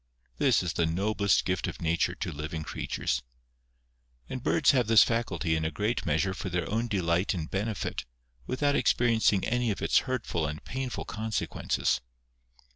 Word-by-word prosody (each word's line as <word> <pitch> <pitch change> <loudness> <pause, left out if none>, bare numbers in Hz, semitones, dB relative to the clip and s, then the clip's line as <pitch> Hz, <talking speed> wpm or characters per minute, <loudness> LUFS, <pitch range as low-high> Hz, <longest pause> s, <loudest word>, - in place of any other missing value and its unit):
This 135 -9 +4
is 85 -1 -2
the 85 - +1
noblest 100 +4 +1
gift 95 0 -1
of - - -6
Nature 85 0 +1
to - - -4
living 75 +2 -5
creatures. - - -2 1.1
And 130 - -5
birds 145 - +4
have 125 -5 +2
this 110 -1 +8
faculty 95 -9 0
in 80 - -1
a 80 - 0
great 105 +5 -2
measure 85 +5 +1
for 95 - -5
their 85 -1 -1
own 115 +3 -1
delight 90 -2 +1
and 80 -3 -3
benefit, 105 +1 -2 0.4
without 145 +2 +1
experi 120 -4 +3
encing 105 -3 +3
any 120 0 +1
of 105 - -2
its - - +3
hurtful 85 -11 -1
and 75 +1 -6
painful 130 -1 -4
consequences. 110 -9 -1
100 Hz, 165 wpm, -29 LUFS, 85-115 Hz, 1.1 s, this